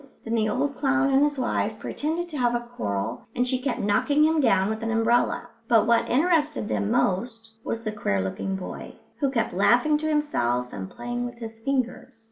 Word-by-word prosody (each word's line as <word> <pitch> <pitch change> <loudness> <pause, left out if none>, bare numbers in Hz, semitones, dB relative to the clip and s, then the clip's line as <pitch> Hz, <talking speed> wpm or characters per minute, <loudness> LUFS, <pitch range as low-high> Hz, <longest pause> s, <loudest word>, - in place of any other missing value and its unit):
Then 225 - -3
the 220 -2 +2
old 280 +3 -1
clown 275 0 +2
and 270 +1 +4
his 290 0 +2
wife 250 -2 -1
pretended 325 +4 -3
to 305 - -5
have 240 -1 +2
a 240 - 0
quarrel, 100 +1 -3
and 250 +1 +1
she 255 0 0
kept 265 -1 -2
knocking 285 +9 +2
him 315 0 +3
down 195 -7 +3
with 220 +1 -3
an 225 - -2
umbrella; 225 +1 +1 0.2
but 225 -3 +4
what 235 0 +2
interested 300 -3 +2
them 100 -1 -1
most 225 +3 0
was 230 0 -3
the 215 - -2
queer 155 - -1
looking 95 - -2
boy, 190 - -7 0.2
who 280 - +2
kept 230 -7 -1
laughing 245 +10 +3
to 310 0 -1
himself 125 - 0
and 95 -1 -6
playing 245 0 -4
with 245 - -9
his 225 -1 -8
fingers. 255 -1 -2
240 Hz, 200 wpm, -25 LUFS, 210-275 Hz, 0.2 s, and